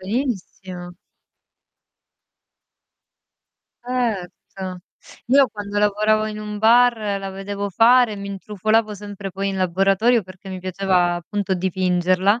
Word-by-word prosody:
Benissimo. 190 Hz, -5 st, -4 dB, 2.9 s
Erto. 190 Hz, -6 st, -4 dB, 0.5 s
Io 270 Hz, +2 st, +5 dB
quando 205 Hz, -1 st, -5 dB
lavoravo 215 Hz, +1 st, +2 dB
in 215 Hz, 0 st, -5 dB
un 210 Hz, 0 st, -6 dB
bar, 235 Hz, +2 st, +5 dB, 0.2 s
la 195 Hz, 0 st, -5 dB
vedevo 200 Hz, +1 st, -5 dB
fare, 230 Hz, +1 st, +4 dB
mi 200 Hz, 0 st, -7 dB
intrufolavo 210 Hz, +2 st, 0 dB
sempre 205 Hz, -1 st, -7 dB
poi 195 Hz, +1 st, -3 dB
in 195 Hz, -, -3 dB
laboratorio 195 Hz, +6 st, +2 dB
perché 185 Hz, +1 st, -13 dB
mi 185 Hz, -, -5 dB
piaceva, 185 Hz, -1 st, +1 dB
appunto, 190 Hz, +3 st, -2 dB
dipingerla, 185 Hz, +3 st, +1 dB
200 Hz, 105 wpm, -21 LUFS, 185-215 Hz, 2.9 s, Io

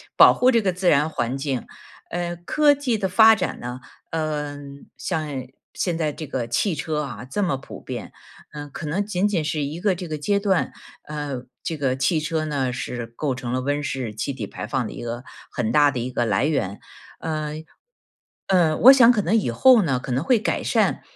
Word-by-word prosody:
保 -, -, +8 dB
护 250 Hz, -, +3 dB
这 235 Hz, -3 st, +4 dB
个 195 Hz, -3 st, +1 dB
自 180 Hz, +1 st, -2 dB
然 150 Hz, +1 st, +4 dB
环 125 Hz, -3 st, -2 dB
境。 135 Hz, -4 st, -3 dB, 0.4 s
呃， 175 Hz, 0 st, -3 dB
科 290 Hz, -, +3 dB
技 275 Hz, -5 st, -1 dB
的 200 Hz, -2 st, -1 dB
发 220 Hz, +4 st, +7 dB
展 185 Hz, -, -3 dB
呢， 125 Hz, +1 st, -6 dB, 0.3 s
嗯， 145 Hz, -3 st, -4 dB
像 160 Hz, -4 st, -2 dB, 0.5 s
现 175 Hz, -3 st, -1 dB
在 155 Hz, -2 st, 0 dB
这 155 Hz, -, -7 dB
个 130 Hz, -4 st, -3 dB
汽 170 Hz, -, 0 dB
车 150 Hz, 0 st, -2 dB
啊， 125 Hz, -4 st, -7 dB
这 205 Hz, +9 st, -1 dB
么 170 Hz, -8 st, 0 dB
普 135 Hz, -, -11 dB
遍， -, -, -7 dB, 0.4 s
嗯， 145 Hz, -1 st, -8 dB
可 155 Hz, -, -6 dB
能 190 Hz, +7 st, -1 dB
仅 195 Hz, -1 st, +1 dB
仅 185 Hz, -6 st, 0 dB
是 150 Hz, 0 st, -1 dB
一 145 Hz, +4 st, -4 dB
个 200 Hz, +1 st, +2 dB
这 180 Hz, 0 st, -6 dB
个 155 Hz, -1 st, -4 dB
阶 200 Hz, +7 st, +1 dB
段。 195 Hz, -3 st, +1 dB, 0.3 s
嗯， 145 Hz, -4 st, -5 dB, 0.2 s
这 165 Hz, -, -2 dB
个 135 Hz, -3 st, 0 dB
汽 135 Hz, +5 st, +2 dB
车 155 Hz, 0 st, -1 dB
呢 135 Hz, -4 st, -1 dB
是 120 Hz, -1 st, -4 dB
构 130 Hz, +4 st, -3 dB
成 125 Hz, -1 st, -5 dB
了 130 Hz, -, 0 dB
温 145 Hz, +2 st, -1 dB
室 130 Hz, -6 st, -4 dB
气 110 Hz, +6 st, -2 dB
体 115 Hz, -6 st, -5 dB
排 -, -, -7 dB
放 120 Hz, +1 st, -1 dB
的 -, -, -8 dB
一 -, -, -8 dB
个 120 Hz, +2 st, -5 dB, 0.3 s
很 115 Hz, -3 st, -1 dB
大 145 Hz, -1 st, +5 dB
的 130 Hz, -, -3 dB
一 125 Hz, +2 st, -3 dB
个 120 Hz, -1 st, -1 dB
来 105 Hz, +4 st, +1 dB
源。 110 Hz, -10 st, -1 dB, 0.4 s
嗯， 155 Hz, -1 st, -4 dB, 0.8 s
呃， 170 Hz, -5 st, +3 dB
我 260 Hz, -, +9 dB
想 250 Hz, -3 st, +7 dB
可 215 Hz, -4 st, 0 dB
能 190 Hz, +5 st, 0 dB
以 205 Hz, -, +1 dB
后 240 Hz, -, +6 dB
呢 135 Hz, -8 st, +1 dB
可 125 Hz, 0 st, -5 dB
能 130 Hz, +3 st, 0 dB
会 250 Hz, +3 st, +4 dB
改 215 Hz, -, -1 dB
善。 -, -, +1 dB
150 Hz, 225 characters per minute, -23 LUFS, 130-180 Hz, 0.8 s, 我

